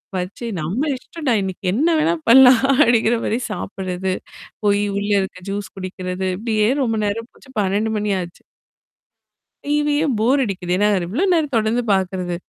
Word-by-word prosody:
பச்சே 185 +6 -4
நம்ம 185 - -2 0.2
இஷ்டம்டா 280 0 -3
இன்னைக்கு 190 0 -5
என்ன 280 +10 +1
வேணா 325 +2 +2 0.2
பண்ணலாம்? 250 0 +8 0.2
அப்படிங்கிற 235 0 +3
மாரி 225 - 0
சாப்படுறது. 190 -2 -3 0.5
போய் 205 0 +3
உள்ள 205 +1 -2
இருக்க 190 -1 -6
ஜூஸ் 200 0 -5
குடிக்கிறது. 185 0 -4
இப்படியே 215 0 0 0.2
ரொம்ப 225 -3 0
நேரம் 230 +3 -3
போச்சு. 260 - -19
12 205 +3 0
மணி 210 0 -1
ஆச்சு. 175 0 -10 1.2
டிவியும் 295 -1 +1
போர் 265 +5 +3
அடிக்குது. 190 -5 -4
ஏன்னா 205 - +3 0.2
எவ்ளோ 240 - -1
நேரம் 305 -4 0
தொடர்ந்து 220 +2 +1
பார்க்குறது? 185 -2 -1
210 Hz, 145 wpm, -20 LUFS, 190-250 Hz, 1.2 s, பண்ணலாம்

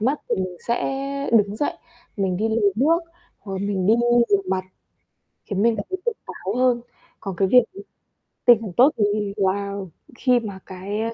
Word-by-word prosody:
mắt 265 +7 0
thì - - +2
mình 185 -1 -3
sẽ 275 +3 -2
đứng 210 -2 +3
dậy, 290 - 0 0.4
mình 190 -3 0
đi 220 +4 0
lấy 220 -3 +2
nước 310 +8 +4 0.4
hoặc 195 - -9
là - - -3
mình 190 -3 -1
đi 215 - +6 0.3
rửa 200 -1 +3
mặt, 185 0 0 0.8
khiến 200 -1 -2
mình 230 0 +3
cảm 200 - -3
thấy 375 - -2
tỉnh 475 -2 -1
táo 195 +3 -5
hơn. 250 -1 +2 0.4
Còn 195 -3 -5
cái 190 +2 +2
việc 250 +5 +7 0.8
tinh 240 -1 +8
thần 215 -4 -5
tốt, 260 +4 +7
thì 205 -1 0
là 200 0 0 0.4
khi 250 -2 +3
mà 200 -4 -7
cái, 190 +3 -5
a, 230 +1 -2
210 Hz, 190 wpm, -23 LUFS, 195-245 Hz, 0.8 s, tinh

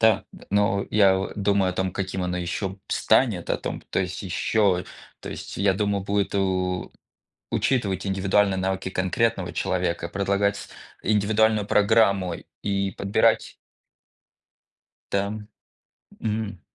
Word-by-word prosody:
Да, 110 -3 +4
н - - -14
но 100 -1 +2
я 100 -3 +5
в 95 - -3
думаю 100 -2 +2
о - - -4
том, 95 0 -1
каким 95 -1 -3
оно 90 0 -2
еще 90 +3 -2
б 95 - -10
станет. - - +2
О - - +2
том, - - -5
то - - 0
есть 90 +1 -4
еще, 95 0 +1 0.4
то - - -7
есть - - -7
я 100 0 +3
думаю, 100 -1 0
будет 100 0 0
у 95 -2 0 0.6
учитывать 100 -7 0
индивидуальные 95 0 +2
навыки 95 0 -1
конкретного 95 +5 0
человека, 85 -2 -1
предлагать 100 +1 +1
с - - -9 0.3
индивидуальную 105 0 +2
программу 100 -4 +3 0.3
и 100 -1 0
подбирать 100 +1 +2 1.6
Да, 100 +1 0 0.9
м. 105 -3 -3
100 Hz, 135 wpm, -25 LUFS, 95-105 Hz, 1.6 s, я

